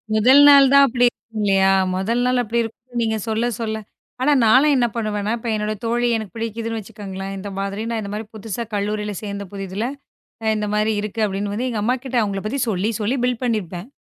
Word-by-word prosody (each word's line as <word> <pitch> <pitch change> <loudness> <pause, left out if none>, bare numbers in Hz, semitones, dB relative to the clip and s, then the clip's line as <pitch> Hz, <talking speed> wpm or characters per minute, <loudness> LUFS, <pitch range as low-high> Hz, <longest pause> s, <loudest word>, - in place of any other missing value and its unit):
முதல் 255 +6 +6
நாள் 280 -2 +8
தான் 280 0 +8
அப்படி 245 0 +2
இருக்கும் 225 -2 -11
இல்லையா? 195 -1 +4 0.2
முதல் 225 +6 0
நாள் 250 0 +2
அப்படி 235 +1 -1
இருக்கும். 240 +2 -9
நீங்கச் 220 -2 -1
சொல்லச் 230 +1 -1
சொல்ல 220 -1 -2 0.4
ஆனா 280 +3 +3
நான்லாம் 265 +7 +5
என்ன 245 -2 +3
பண்ணுவேன்னா, 215 -1 -1
இப்ப 230 0 -5
என்னோட 210 0 -1
தோழி 240 +1 +1
எனக்குப் 215 -5 -5
பிடிக்குதுன்னு 225 0 -3
வச்சுக்கோங்களேன், 195 -2 -7
இந்த 200 +1 -6
மாதிரி 200 +1 -3 0.2
இந்த 200 - -6
மாதிரி 215 +2 -4
புதுசா 220 +1 -4
கல்லூரியில 210 +1 -2
சேர்ந்த 200 -1 -4
புதிதுல, 195 +2 -4 0.6
அ - - -2
இந்த 210 0 -2
மாதிரி 215 +1 +2
இருக்கு 210 +1 -3
அப்படின்னு 205 +4 -3
எங்க 220 -3 -2
அம்மா 250 +3 +2
கிட்ட 260 -1 -3
அவங்கள 200 -2 -2
பத்தி 270 +6 -2
சொல்லிச் 210 +3 -1
சொல்லி 230 +6 0
பிள்ட் 250 -1 -1
பண்ணி 230 -3 +1
இருப்பேன். 180 +4 -8
220 Hz, 195 wpm, -21 LUFS, 205-235 Hz, 0.6 s, நாள்